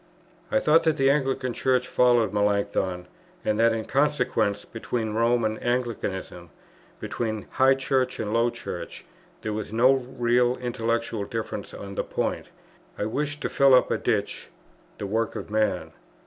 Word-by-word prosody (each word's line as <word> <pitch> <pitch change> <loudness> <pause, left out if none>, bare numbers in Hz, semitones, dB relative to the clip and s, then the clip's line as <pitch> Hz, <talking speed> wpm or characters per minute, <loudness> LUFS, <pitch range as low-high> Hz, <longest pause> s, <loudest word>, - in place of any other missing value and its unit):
I 275 - +2
thought 160 -8 +4
that 160 -1 +2
the 135 -1 +4
Anglican 135 -3 0
Church 125 +1 +1
followed 120 -3 +3
Melanchthon, 100 -3 0 0.4
and 105 0 +1
that 115 0 +5
in 110 -1 -2
consequence 135 -8 +1
between 115 -1 -3
Rome 115 +1 +2
and 110 0 -2
Anglicanism, 110 -8 -3 0.5
between 110 -3 -3
high 135 +1 +4
Church 130 -1 0
and 110 -1 -2
low 115 +1 +3
Church, - - -7 0.4
there 110 - -2
was 105 0 -4
no 120 +4 +5
real 125 -1 +1
intellectual 115 -3 -2
difference 110 -2 -5
on 100 0 -8
the - - -1
point. - - -3 0.5
I - - -1
wished 145 +6 -2
to - - 0
fill 135 -1 +5
up 125 - +3
a - - +2
ditch, - - -1 0.5
the - - -5
work 110 +3 -1
of - - -6
man. 110 0 0
115 Hz, 155 wpm, -25 LUFS, 110-130 Hz, 0.5 s, that